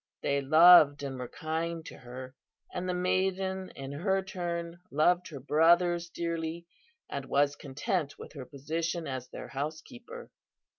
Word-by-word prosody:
They 140 0 +1
loved 155 0 +7
and 135 -2 -5
were 125 - -4
kind 160 +2 -3
to - - -9
her, 130 +1 -9 0.4
and 180 0 -3
the - - +1
maiden 190 +1 0
in 135 0 -7
her 190 +6 0
turn 175 -2 -4
loved 175 +5 +2
her 150 -4 -8
brothers 170 +4 +3
dearly, 170 0 -3 0.4
and 140 -1 -5
was 140 +2 +2
content 145 - -3
with - - -11
her 135 -4 -8
position 160 +4 -3
as 130 -3 -5
their - - -8
housekeeper. 165 - -7
165 Hz, 145 wpm, -30 LUFS, 140-180 Hz, 0.4 s, loved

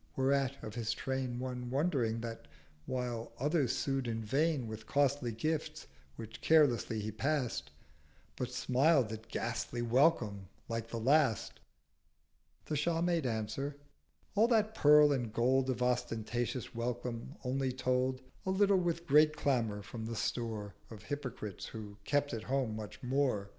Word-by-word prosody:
Whereat 135 0 +1
of 110 - -6
his 115 -1 -1
Train 130 -1 -2
One 125 -1 -4
wondering 130 -6 0
that, 115 -1 -6 0.4
while 125 -3 -3
others 145 -1 +1
sued 135 -2 -1
in 115 -1 -2
vain 140 +4 +1
With 110 0 -7
costly 140 -3 +2
gifts, 155 +6 -2 0.3
which 110 -1 -9
carelessly 130 -8 +4
he 105 +1 -3
pass'd, 130 - -1 0.7
But 125 - -3
smiled 130 -1 +3
at 110 0 -7
ghastly 120 +1 -3
Welcome 120 - +2 0.2
like 115 0 -3
the 115 - -5
last; 130 -1 +2 1.1
The 155 - -2
Shah 165 +3 +1
made 170 -5 +1
answer—'All 140 - -3
that 220 -2 +2
Pearl 150 -4 +7
and 120 -5 -1
Gold 130 +3 +2
Of 125 -1 0
ostentatious 120 0 -1
Welcome 120 +2 -4
only 130 +1 0
told: 130 0 0 0.2
A - - -3
little 195 0 +4
with 170 -1 -1
great 150 0 +5
Clamour 115 -8 0
from 110 0 -6
the 115 - -4
Store 110 -4 -2 0.2
Of 105 -2 -10
hypocrites 125 -8 -5
who 105 -2 -8
kept 145 -1 +1
at 115 - -3
home 130 -5 0
much 110 +4 -8
more. 125 -6 0
125 Hz, 140 wpm, -33 LUFS, 115-145 Hz, 1.1 s, Pearl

